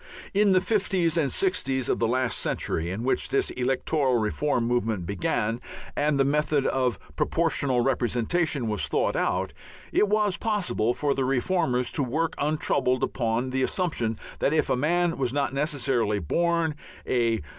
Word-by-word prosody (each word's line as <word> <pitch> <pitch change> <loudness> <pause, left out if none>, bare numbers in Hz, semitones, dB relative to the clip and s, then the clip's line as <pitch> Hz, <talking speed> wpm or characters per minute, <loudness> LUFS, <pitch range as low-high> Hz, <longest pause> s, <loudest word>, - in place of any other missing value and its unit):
In 205 0 +4
the 185 - +4
fifties 190 -5 +1
and 155 -5 +1
sixties 135 - 0
of - - 0
the 115 - +2
last 125 0 0
century, 80 +1 -2
in 100 +5 -4
which 130 - 0
this 140 - +1
electoral 130 +1 0
reform 120 +4 0
movement 115 -6 0
began 105 +5 -1 0.3
and 145 -1 +1
the 135 - +4
method 150 0 +1
of 125 -6 +1 0.2
Proportional 140 - +1
Representation 130 +3 0
was 105 -3 -1
thought - - 0
out, - - 0 0.4
it 210 - +3
was 210 -2 +2
possible 180 - 0
for 145 -2 0
the 135 - -1
reformers 130 -1 +1
to 150 - -1
work 155 +6 -1
untroubled 140 -3 +1
upon 120 -1 -1
the 130 0 0
assumption 130 - 0 0.2
that 140 - +1
if 155 - +1
a - - +3
man 170 +5 +1
was 125 -2 0
not 140 -2 0
necessarily 135 -7 0
born 165 - 0 0.3
a 115 -3 +1
135 Hz, 155 wpm, -26 LUFS, 120-160 Hz, 0.4 s, In